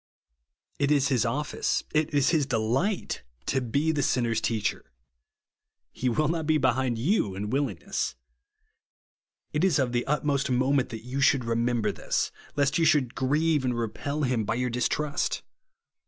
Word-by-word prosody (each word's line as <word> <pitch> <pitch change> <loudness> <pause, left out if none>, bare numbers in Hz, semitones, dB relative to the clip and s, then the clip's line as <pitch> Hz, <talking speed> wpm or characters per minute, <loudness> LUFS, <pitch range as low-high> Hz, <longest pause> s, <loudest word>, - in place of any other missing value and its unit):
It 140 0 +2
is 140 -2 +3
his 125 -3 +2
office, 145 +6 -1
it 155 +1 +1
is 145 -2 +3
his 155 -5 +2
delio^ht, 130 - 0 0.3
to 135 - 0
be 140 +7 +1
the 150 -2 0
sinner's 115 -4 +1
teacher. 110 - -2 1.0
He 125 - -1
will 150 +6 +1
not 160 -1 -1
be 155 -1 +4
behind 130 -3 +1
you 120 - +1
in 105 +2 -4
willingness. 130 - -2 1.4
It 150 +3 0
is 190 -6 +3
of 130 -3 +1
the 120 0 -1
utmost 145 -1 0
moment 130 +1 +2
that 110 -1 -8
you 130 +2 -3
should 135 -2 +3
remember 115 0 +1
this; - - -1 0.2
lest 140 +1 +2
you - - +3
should 135 -6 +3
grieve 150 +3 +1
and 125 -2 0
repel 140 +6 -3
him 125 -4 +1
by 105 - -1
your 125 0 -1
distrust. 145 +4 -1
130 Hz, 155 wpm, -27 LUFS, 120-150 Hz, 1.4 s, be